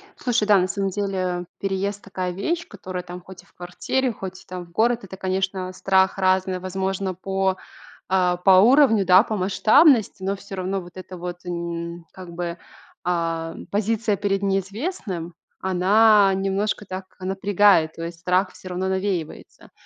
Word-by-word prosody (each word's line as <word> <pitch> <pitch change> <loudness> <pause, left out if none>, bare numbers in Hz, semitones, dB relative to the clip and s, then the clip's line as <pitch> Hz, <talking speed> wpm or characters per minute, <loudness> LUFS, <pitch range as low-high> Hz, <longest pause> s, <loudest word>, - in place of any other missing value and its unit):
Слушай 240 -5 0
да 205 -1 +6
на 185 0 +2
самом 195 0 -1
деле, 185 -3 -2
переезд 195 +1 -2
такая 185 -2 -4
вещь, 330 - -2
которая 185 -3 -7
там 180 0 -9
хоть 185 0 -13
и - - -25
в - - -28
квартире, 245 +9 -2
хоть 190 -2 -8
и - - -33
там 180 -1 -7
в 170 - -21
город, 235 +4 +1
это, 190 0 -9
конечно, 190 0 -2
страх 190 0 +2
разный, 185 0 +1
возможно, 190 +1 -2
по, 190 +1 -1 0.5
а, 180 -2 +2
по 190 +2 +4
уровню, 235 -3 +5
да, 185 +3 +7
по 220 - -3
масштабности, 215 - +4
но 195 +1 0
всё 200 0 -9
равно 190 +1 -2
вот 175 0 -13
эта 185 -1 -9
вот, 175 +1 -7
м, 170 -1 -5
как 185 -2 -10
бы, 170 0 -4 0.5
ам, 165 -2 -2
позиция 215 +1 0
перед 195 0 -1
неизвестным, 195 - -3 0.3
она 195 +2 +4
немножко 195 +2 -1
так 185 0 -6
напрягает, 190 -3 +3
то 165 - -6
есть, 170 0 -8
страх 185 +2 +1
всё 185 - -11
равно 185 +1 -2
навеивается. 190 -4 -4
190 Hz, 165 wpm, -23 LUFS, 180-200 Hz, 0.5 s, да